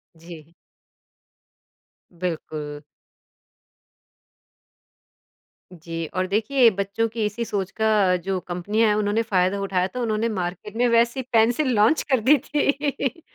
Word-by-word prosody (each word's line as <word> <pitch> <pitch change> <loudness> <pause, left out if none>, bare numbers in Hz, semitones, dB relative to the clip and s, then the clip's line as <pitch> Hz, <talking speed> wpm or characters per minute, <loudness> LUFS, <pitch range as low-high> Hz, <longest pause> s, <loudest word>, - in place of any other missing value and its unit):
जी। 165 -1 -13 1.7
बिल्कुल। 155 -4 -5 2.9
जी 165 -1 -6
और 185 0 -1
देखिए 225 +5 +3
बच्चों 200 +3 -1
की 220 -1 -2
इसी 210 +3 -3
सोच 195 -3 -3
का 210 -4 +2
जो 190 -1 -1
कंपनियाँ 200 +6 -1
है, 210 - +2
उन्होंने 210 +2 +1
फ़ायदा 195 -2 +1
उठाया 190 -2 0
था, 250 - -7
उन्होंने 225 -1 0
मार्केट 190 +1 -5
में 245 0 +3
वैसी 235 +2 +2
पेंसिल 240 +5 +3
लॉन्च 215 +9 +4
कर 260 - +4
दी 295 +1 +7
थी। 285 +1 -1
210 Hz, 115 wpm, -23 LUFS, 185-235 Hz, 2.9 s, दी